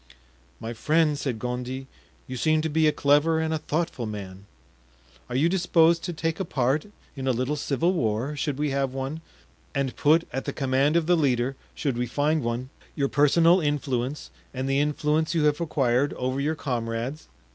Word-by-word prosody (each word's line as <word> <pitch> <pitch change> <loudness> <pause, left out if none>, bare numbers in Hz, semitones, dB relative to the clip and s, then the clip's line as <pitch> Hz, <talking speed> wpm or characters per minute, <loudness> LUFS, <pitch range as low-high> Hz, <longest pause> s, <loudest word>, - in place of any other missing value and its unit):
"My 115 +1 -5
friend," 155 +5 +2
said 135 -5 -3
Gondy, 125 +3 -4 0.4
"you 130 - -6
seem 155 +4 +2
to 160 - 0
be 160 +1 +3
a - - +5
clever 145 +3 +3
and 160 0 0
a 160 - -1
thoughtful 150 -7 -2
man; 100 -2 -8 0.8
are 125 - -4
you 145 +6 +3
disposed 170 -2 +3
to - - -2
take 165 +1 -2
a - - 0
part 140 0 0 0.3
in 135 -1 -4
a - - +4
little 130 +4 -1
civil 150 +5 0
war, 120 - -1
should 145 -1 -2
we 150 -1 0
have 135 -1 -1
one, 135 +4 -4 0.5
and 135 -2 -1
put 160 +3 +3
at 135 - -3
the - - -3
command 135 +3 +1
of 170 -2 +3
the 175 +2 +4
leader, 135 -4 +1 0.2
should 135 -5 -2
we 125 - 0
find 150 +5 +1
one, 120 +2 -3 0.2
your 140 -2 0
personal 165 +5 +4
influence 145 -2 -2 0.2
and 130 +1 -2
the 135 +1 +2
influence 150 +2 0
you 160 - +2
have 150 +2 +2
acquired 140 -4 +1
over 130 +1 -2
your 150 +3 0
comrades?" 120 +1 -3
145 Hz, 185 wpm, -26 LUFS, 130-155 Hz, 0.8 s, a